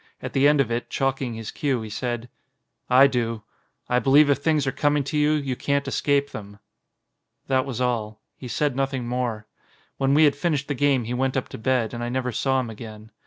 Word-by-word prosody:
At - - -7
the 135 +1 +4
end 150 0 +4
of 125 -4 +1
it, 120 +1 -2
chalking 135 -3 -1
his 110 -1 -6
cue, 135 -5 -1
he 110 - -7
said: 120 +1 -3 0.6
"I 130 +2 +7
do. 115 -5 -1 0.4
I 125 - +2
believe 145 +3 +5
if 140 - +1
things 150 -1 +1
are 135 - 0
coming 145 +1 +1
to 140 +3 -5
you, 150 0 +3
you 140 -4 -1
can't 140 +2 -1
escape 140 -1 +1
them." 100 -1 -9 0.9
That 130 0 +1
was 125 -3 -4
all. 115 -4 -1 0.2
He 130 - -9
said 145 +2 -1
nothing 135 -2 -2
more. 120 -3 -2 0.5
When 135 +1 +2
we 155 - +6
had 145 -2 +4
finished 145 -2 -1
the - - +1
game 140 -2 +2
he 115 +2 -4
went 130 +1 0
up 130 - -3
to - - -8
bed, 120 -1 0
and 120 0 -4
I 120 - -2
never 125 0 -2
saw 135 +3 +1
him 120 -3 -4
again. 110 0 -10
130 Hz, 215 wpm, -24 LUFS, 120-140 Hz, 0.9 s, I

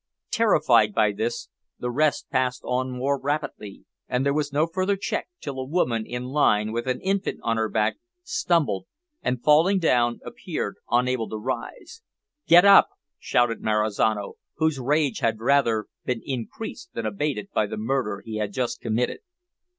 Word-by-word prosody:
Terrified 130 - +3
by 105 - +3
this, 110 +4 -3 0.3
the 125 - -3
rest 145 0 +1
passed 130 -1 0
on 130 +1 -1
more 135 +3 -1
rapidly, 140 -8 -4 0.2
and 125 +2 0
there 140 - +2
was 145 -1 -1
no 150 +3 +2
further 185 +4 0
check - - -3
till 140 -3 -6
a - - -2
woman 125 -7 0
in 125 0 -4
the 125 - -6
line, 110 -7 +2
with 120 +2 -3
an 130 -1 0
infant 195 +1 -1
on 115 -1 0
her 110 -1 0
back, 105 +1 0 0.3
stumbled, 165 - 0 0.3
and, 125 -1 -2
falling 160 +6 +5
down, 120 -9 +2
appeared - - -5
unable 125 -1 +1
to 110 - -4
rise. 130 - -6 0.5
"Get 175 +3 +8
up!" 200 0 +8 0.3
shouted 120 -1 +1
Marizano, 105 -1 0 0.2
whose 160 -2 0
rage 140 0 +1
had 115 -1 0
rather 115 -3 +2 0.2
been 125 -3 -2
increased 140 - -6
than 115 - -3
abated 105 0 -2
by 105 - +1
the - - -6
murder 110 -3 -2
he 110 -1 -5
had 105 -1 -3
just 120 0 -2
committed. 115 +2 -1
125 Hz, 165 wpm, -25 LUFS, 110-150 Hz, 0.5 s, Get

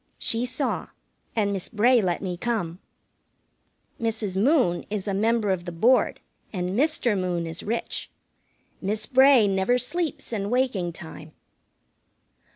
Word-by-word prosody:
She 230 +2 -1
saw, 255 +3 -2 0.5
and 205 -3 +1
Miss 190 -2 -4
Bray 235 +2 +4
let 180 -1 -1
me 180 -2 -2
come. 185 -4 -2 1.2
Mrs. 220 -4 -2
Moon 220 - +3
is 210 -1 -3
a 200 - 0
member 215 +1 +1
of 180 -2 -2
the 175 - -4
Board, 235 +10 +3 0.3
and 180 -3 -2
Mr. 250 -1 +2
Moon 180 -3 -1
is 165 0 -5
rich. 230 +3 -3 0.7
Miss 210 +2 -1
Bray 260 -2 +6
never 195 +5 +2
sleeps 305 +1 -3
in 200 -2 -2
waking 235 -9 0
time. 160 -2 -10
210 Hz, 135 wpm, -25 LUFS, 185-245 Hz, 1.2 s, Bray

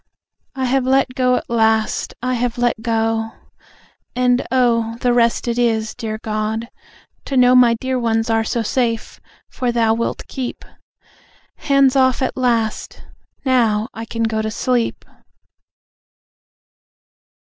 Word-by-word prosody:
I 265 -1 -1
have 260 +1 +1
let 265 -1 +2
go 250 -1 +2
at - - -4
last. 220 -2 +1
I 255 0 0
have 245 0 -1
let 240 -2 0
go. 225 -1 -1 0.8
And, 250 0 +1
oh, 230 -3 +1
the 245 -1 +2
rest 235 0 +2
it 235 0 -1
is, 220 -2 0
dear 220 -3 -5
God, 215 +2 -3 0.6
to 270 - -2
know 250 0 +6
My 245 -2 +6
dear 260 +2 -2
ones 225 -1 0
are 225 -1 +1
so 230 +1 -2
safe, 230 0 -2 0.3
for 250 -2 -2
Thou 230 -2 +2
wilt 230 +1 -3
keep. 255 -2 -6 0.9
Hands 275 -3 +3
off, 260 0 +3
at - - -2
last! 235 -4 -1 0.4
Now, 230 -4 +2
I 225 - -7
can 230 0 -3
go 220 -1 0
to 220 - -2
sleep. 240 +2 -1
235 Hz, 135 wpm, -19 LUFS, 225-255 Hz, 0.9 s, know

